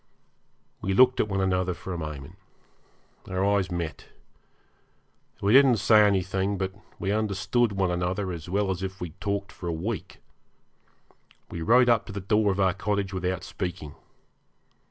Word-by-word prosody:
We 95 0 -1
looked 130 +3 +5
at - - +2
one 95 -1 -1
another 90 -1 0
for 95 - -7
a - - -4
moment. 75 +1 -7 0.9
Our 95 +1 0
eyes 100 -2 +2
met. 85 -3 -5 1.3
We 100 +2 +2
didn't 135 -3 +7
say 110 +2 +5
anything; 95 0 0
but 95 0 -2 0.2
we 95 - -2
understood 105 +2 +1
one 95 -2 0
another 90 +2 -1
as 85 -1 -7
well 100 +1 +1
as 90 -1 -4
if 95 0 -5
we 90 - -4
had 80 - -22
talked 100 -1 -2
for 90 - -8
a - - 0
week. 90 +5 -4 1.3
We 85 - -5
rode 125 +8 +5
up 115 -3 +3
to - - -7
the 100 - -4
door 105 +2 +2
of 95 - -3
our 95 -2 +3
cottage 100 0 -2
without 90 -1 -2
speaking. 85 -6 -5
95 Hz, 165 wpm, -26 LUFS, 90-100 Hz, 1.3 s, didn't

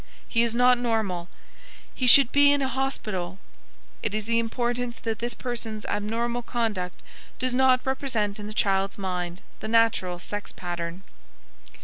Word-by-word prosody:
"He 230 - +2
is 235 -1 +1
not 250 0 +5
normal." 210 -7 -1 0.6
"He 255 - -1
should 265 +1 +8
be 285 0 +6
in 285 -1 +2
a - - +1
hospital." 215 -9 -3 0.6
It - - -2
is 215 0 -3
important 235 +1 -1
that 225 -1 -2
this 240 +1 -3
person's 230 -3 -5
abnormal 230 +4 -1
conduct 220 -7 -3 0.3
does 255 -1 -1
not 255 0 +4
represent 230 -6 -1
in 205 - -6
the - - -6
child's 195 -3 +1
mind 180 -2 -3 0.2
the - - -5
natural 220 -6 +2
sex 205 +3 -6
pattern. 175 0 -5
225 Hz, 145 wpm, -26 LUFS, 195-245 Hz, 0.6 s, should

